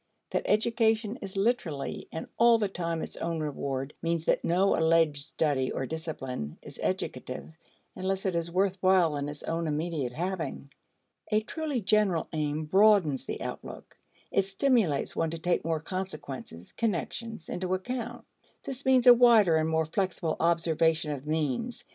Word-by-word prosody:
That - - -1
education 225 0 +2
is 195 -1 -5
literally 195 - -1
and 160 - -5
all 235 0 +7
the 210 -2 0
time 170 -3 -3
its - - -6
own 165 -1 -2
reward 140 -2 -3
means 165 -1 -1
that - - +2
no 185 +4 +3
alleged 160 -3 +3
study 140 -4 0
or 135 - -2
discipline 135 - -5
is - - -12
educative 160 - -3 0.4
unless 190 +1 -2
it 185 -2 0
is 170 0 -1
worth 190 +2 +1
while 185 -5 +4
in 145 0 -2
its 145 0 -8
own 165 0 -2
immediate 150 -4 -2
having. 160 -4 -4 0.6
A 215 0 +3
truly 295 +2 -3
general 195 -4 +2
aim 155 0 -1
broadens 190 -5 +4
the - - -5
outlook; - - -8 0.4
it 195 - +2
stimulates 195 - +1
one 165 - 0
to 165 - -4
take 175 +2 0
more 165 0 0
consequences 155 - -6
(connections) 220 - -3
into 185 +1 -1
account. 240 +5 -5 0.4
This 270 0 -7
means 260 -1 +5
a 245 - +11
wider 230 -8 +6
and 160 0 +1
more 160 0 +1
flexible 175 -1 -1
observation 165 -2 +2
of 145 0 -6
means. 160 - -2
170 Hz, 155 wpm, -29 LUFS, 155-205 Hz, 0.6 s, a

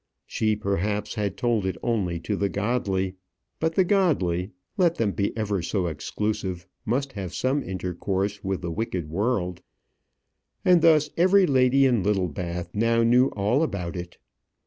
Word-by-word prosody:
She, 110 -1 0
perhaps, 105 +1 -1
had 100 -3 -2
told 120 -4 +1
it 95 -2 -2
only 95 -8 0
to 105 - -2
the 100 0 0
godly; 100 -4 -1 0.4
but 160 0 0
the 190 - +5
godly, 120 - +1 0.3
let 175 -3 +3
them 110 -3 0
be 100 0 -1
ever 105 -4 -1
so 90 +2 -1
exclusive, 90 +2 -3 0.2
must 135 +4 -1
have 95 -4 -5
some 135 +3 +1
intercourse 95 +2 -3
with 95 -1 -2
the 85 - -2
wicked 90 -5 -3
world; 90 -2 -1 1.0
and 180 -2 +6
thus 155 -3 +4
every 185 +3 +5
lady 135 -1 +4
in 120 -5 +3
Littlebath 90 -3 -2
now 115 +2 +2
knew 125 +3 +5
all 105 +8 +1
about 100 - -2
it. 85 0 -7
105 Hz, 150 wpm, -25 LUFS, 95-125 Hz, 1.0 s, and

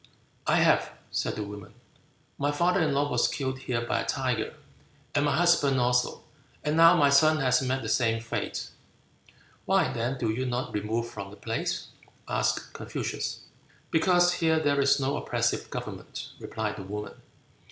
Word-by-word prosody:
"I - - +4
have," - - +3 0.2
said - - -1
the 105 - -3
woman, 100 -2 -9 0.6
"my 145 +1 +1
father 175 +5 +2
in 155 -2 +2
law 140 +1 +1
was - - +3
killed 130 -2 -3
here 125 -2 -2
by - - 0
a - - -4
tiger, 125 -5 -1 0.6
and 145 - +2
my 145 -1 +2
husband 155 -6 +4
also; 125 0 +1 0.4
and 150 +1 0
now 165 +1 +7
my 140 -1 +4
son 155 +3 +5
has 125 -3 +2
met 130 0 -1
the - - -4
same 115 -2 +2
fate." 115 0 -4 1.0
"Why, - - +2
then, 120 +4 -2
do 115 -3 0
you 130 +4 -2
not 125 +1 -3
remove 110 +3 -1
from 100 -4 -7
the 105 - -13
place?" 115 0 -3 0.4
asked - - -1
Confucius. - - -4 0.5
"Because 175 +1 +4
here 160 -2 +2
there 145 -2 +2
is 140 +1 +4
no 140 +2 0
oppressive - - -1
government," - - -6
replied 110 -1 -4
the 100 - -6
woman. 105 +2 -6
130 Hz, 165 wpm, -28 LUFS, 115-145 Hz, 1.0 s, now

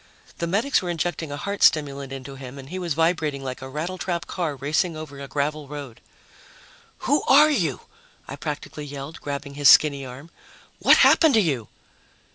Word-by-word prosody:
The 170 - -1
medics 220 +10 +1
were 180 - -4
injecting 170 -2 -3
a 145 - -4
heart 200 +7 -4
stimulant 140 -3 +2
into 135 0 -7
him 135 0 -9
and 135 0 -10
he 185 +2 -5
was 170 -5 -2
vibrating 160 -4 0
like 130 -1 -6
a 130 - -7
rattletrap 170 +3 -3
car 165 -6 -3
racing 155 +5 -1
over 150 -3 -9
a 140 - -7
gravel 150 +1 -2
road. 140 -5 -9 1.0
"Who 290 - +3
are 300 +3 +7
you?" 165 - 0 0.5
I 140 - -6
practically 150 0 -6
yelled, 145 +2 -8
grabbing 140 0 -5
his 145 -1 +5
skinny 140 -3 +6
arm. 130 +6 -10 0.5
"What - - +6
happened 315 -6 +6
to - - +6
you?" 135 - 0
150 Hz, 175 wpm, -24 LUFS, 140-170 Hz, 1.0 s, are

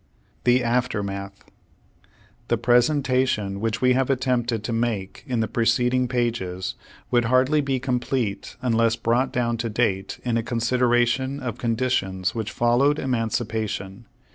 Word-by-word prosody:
THE 125 +1 +4
AFTERMATH 100 -5 -2 1.0
The - - +1
presentation 125 -5 +2
which 115 +1 -2
we 125 0 +5
have 130 +1 +1
attempted 125 -4 0
to 115 - -3
make 115 -4 -2
in 125 -3 0
the 110 - 0
preceding 125 +2 +1
pages, 115 -7 -2 0.4
would 120 -1 +3
hardly 130 +5 +3
be 135 -2 -1
complete 125 -4 -2
unless 115 -2 +2
brought 120 +3 +1
down 120 -1 0
to 115 0 -2
date, 100 -4 -1
in 120 -2 0
a - - +1
con 115 +1 -4
sideration 125 +3 +1
of 120 -2 -5
conditions 110 -6 0
which 110 -1 -3
followed 125 +5 +2
emancipa 115 -4 -1
tion. 100 +4 -7
120 Hz, 140 wpm, -24 LUFS, 110-125 Hz, 1.0 s, we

